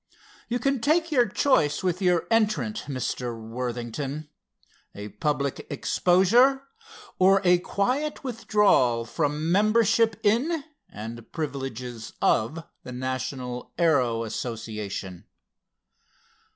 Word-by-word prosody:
You 240 - -1
can 275 0 0
take 325 +5 +2
your 245 -5 +4
choice 165 - +2
with 180 0 -1
your 180 -3 +2
entrant, 210 - +1
Mr. 125 -3 -3
Worthington: 125 +5 -5 0.7
a 105 +1 -7
public 145 +2 -2
exposure, 235 +10 +3 0.6
or 195 +1 +6
a 180 -1 +5
quiet 255 +13 -1
withdrawal 210 - +2
from 150 +4 -1
membership 220 +2 +3
in 270 +10 +1 0.3
and 115 +2 -9
privileges 130 -6 -5
of 150 +10 +1 0.2
the 125 - -9
National 130 0 -4
Aero 130 -9 +2
Association." 105 -5 -5
150 Hz, 100 wpm, -26 LUFS, -, 0.7 s, or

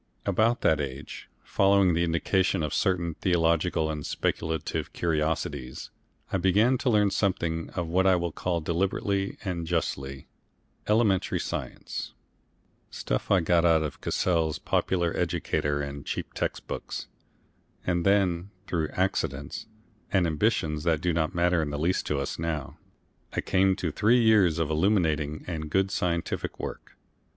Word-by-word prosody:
About 115 +2 +2
that 80 -2 +3
age, 70 +1 -7
following 100 -2 +3
the 85 +1 +2
indication 85 +2 +1
of 75 - -2
certain 85 -3 +1
theological 85 -2 +1
and 75 -1 -5
speculative 80 +1 -2
curiosities, 75 -5 -2 0.4
I 95 - +2
began 105 +8 +3
to 130 - +1
learn 105 -3 +3
something 85 -5 -1
of 90 -1 -1
what 90 +3 +2
I 95 - +6
will 85 -1 -1
call 85 +1 -2
deliberately 95 +4 -1
and 85 -3 -3
justly, 70 -5 -2 0.6
Elementary 105 -3 +2
Science - - -5 0.7
stuff - - -3
I 100 -3 +4
got 85 +1 +3
out 80 -2 +4
of 75 - -5
Cassell's 80 -4 +1
Popular 85 -3 0
Educator 80 -4 0
and 70 0 -6
cheap - - -4
text - - -3
books - - -5 0.8
and 85 -1 +1
then, 95 -2 +2 0.2
through 80 -5 -1
accidents 75 -7 -2 0.4
and 95 -3 +3
ambitions 75 -1 0
that 80 -2 +1
do 90 -1 +1
not 85 +2 0
matter 85 0 +3
in 75 - -2
the 75 - -3
least 85 +5 0
to 75 - 0
us 70 +2 -3
now, 80 -4 -3 0.5
I - - 0
came 95 0 +3
to 90 -5 -2
three 115 +9 +3
years 105 -8 +4
of 80 -2 0
illuminating 80 -4 +1
and 80 -3 -4
good 95 +4 +1
scientific 85 -3 -2
work. - - -7
85 Hz, 145 wpm, -27 LUFS, 80-95 Hz, 0.8 s, I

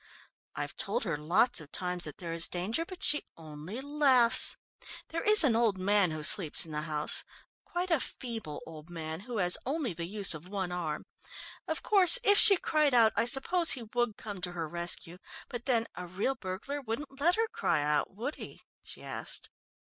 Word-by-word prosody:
"I've - - -6
told - - -2
her 170 -7 -4
lots 170 +8 +2
of 150 - -16
times 180 -1 -3
that 150 - -8
there 170 -2 -7
is 165 0 +2
danger, 210 - -3
but 370 -2 -11
she 295 - +3 0.2
only 160 - -10
laughs. 270 -5 +3 0.5
There 330 - -5
is 425 -3 +6
an 255 -6 +1
old 225 -4 0
man 200 0 +1
who 155 -1 -7
sleeps 170 -1 +3
in 160 - -13
the 150 0 -3
house 150 -1 0 0.4
quite 360 +1 -5
a 325 - +2
feeble 225 - -7
old 160 0 -13
man 160 -2 -7
who 230 +4 -8
has 180 -3 +4
only 270 - -4
the 170 0 -6
use 200 0 +5
of 155 +3 -10
one 190 -2 -5
arm. 165 -4 -5 0.6
Of - - -4
course, 390 0 +6
if 405 -3 +5
she 405 -4 +9
cried 305 -5 0
out, 225 -3 +3
I 230 - 0
suppose 330 +8 +6
he 250 - -6
would 240 -3 -2
come 205 -4 -9
to 180 0 -4
her 165 -2 -6
rescue, 170 +1 -4 0.3
but 240 -1 -8
then 230 -3 +1
a 180 0 -9
real 195 +9 -3
burglar 235 +8 -8
wouldn't 270 +3 -8
let 345 +4 +2
her 450 0 -1
cry 450 - -2
out, 150 0 -2
would 245 +9 -6
he?" - - -11 0.2
she - - -10
asked. - - -4
205 Hz, 195 wpm, -28 LUFS, 170-270 Hz, 0.6 s, she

